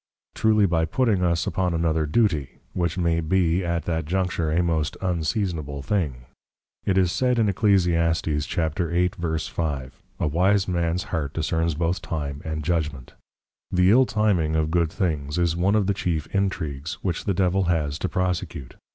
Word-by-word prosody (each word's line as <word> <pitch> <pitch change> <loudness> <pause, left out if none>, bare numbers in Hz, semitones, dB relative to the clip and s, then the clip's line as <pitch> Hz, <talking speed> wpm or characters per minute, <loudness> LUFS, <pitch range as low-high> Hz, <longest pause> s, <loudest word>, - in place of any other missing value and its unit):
Truly 110 -2 +3
by 85 -3 +2
putting 105 +1 +1
us 85 -1 +1
upon 90 -2 0
another 80 -2 +1
Duty, 80 - +1 0.2
which 85 -1 -1
may 85 -2 +1
be 85 +2 +1
at 85 -2 -2
that 80 -2 -1
juncture 90 -2 0
a 85 +3 +2
most 80 -3 -1
Unseasonable 85 - -2
Thing. 70 -8 -1 0.6
It 95 -1 +1
is 90 -2 +3
said 125 +7 +1
in 115 - +3
Eccl. 105 +1 +1
8.5. 85 -3 0 0.3
A - - +1
Wise 95 +6 +2
Mans 85 -1 0
heart 75 -5 -3
discerns 80 0 0
both 85 +3 -1
Time 70 -3 -4
and 80 -1 -4
Judgment. 75 -6 -2 0.6
The 90 +1 +4
Ill 130 +3 +5
Timing 95 -8 +1
of 80 0 +1
good 85 -2 +1
Things, 75 -7 -2
is 85 -2 +1
One 95 +4 +2
of 105 -2 +2
the 100 - +1
chief 85 -6 -2
Intregues, 80 -7 -2
which 90 -4 -2
the 100 - 0
Devil 95 +1 +2
has 80 -4 0
to 95 - -2
Prosecute. 90 -6 -3
85 Hz, 160 wpm, -24 LUFS, 80-95 Hz, 0.6 s, Ill